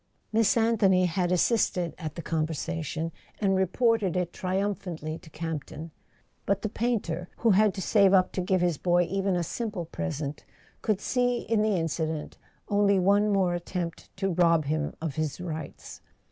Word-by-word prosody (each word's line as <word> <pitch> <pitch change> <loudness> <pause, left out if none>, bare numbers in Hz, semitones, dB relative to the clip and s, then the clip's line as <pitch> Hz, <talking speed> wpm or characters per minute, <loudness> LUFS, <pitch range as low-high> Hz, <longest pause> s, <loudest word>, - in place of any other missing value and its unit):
Miss 225 0 +3
Anthony 210 -5 +4
had 180 0 0
assisted 180 -2 +2
at 155 -3 -5
the 170 - -6
conversation 160 0 -2 0.3
and 195 -2 +2
reported 190 0 +2
it 180 -1 -1
triumphantly 185 -4 -3
to 160 - -15
Camp 155 -2 -4
ton; 160 +2 -9 0.6
but 200 0 +1
the 215 - -1
painter, 200 -7 -2
who 230 - +3
had 210 +2 +5
to 190 - -3
save 200 -3 +4
up 185 -1 +4
to 185 - -2
give 185 0 +1
his 175 -4 +1
boy 175 0 +3
even 195 +2 0
a 175 - 0
simple 205 -1 -4
present, 140 - -4 0.4
could 215 -4 0
see 245 -1 +1
in 225 -2 +1
the 215 -1 +2
incident 160 -1 -3 0.3
only 200 -1 +3
one 200 +3 +3
more 190 -3 +2
at¬ 175 - -2
tempt 175 -2 -5
to 195 -1 0
rob 165 -3 +3
him 150 +1 -1
of 160 -3 -4
his 155 0 -2
rights. 160 -4 -7
180 Hz, 170 wpm, -27 LUFS, 165-200 Hz, 0.6 s, had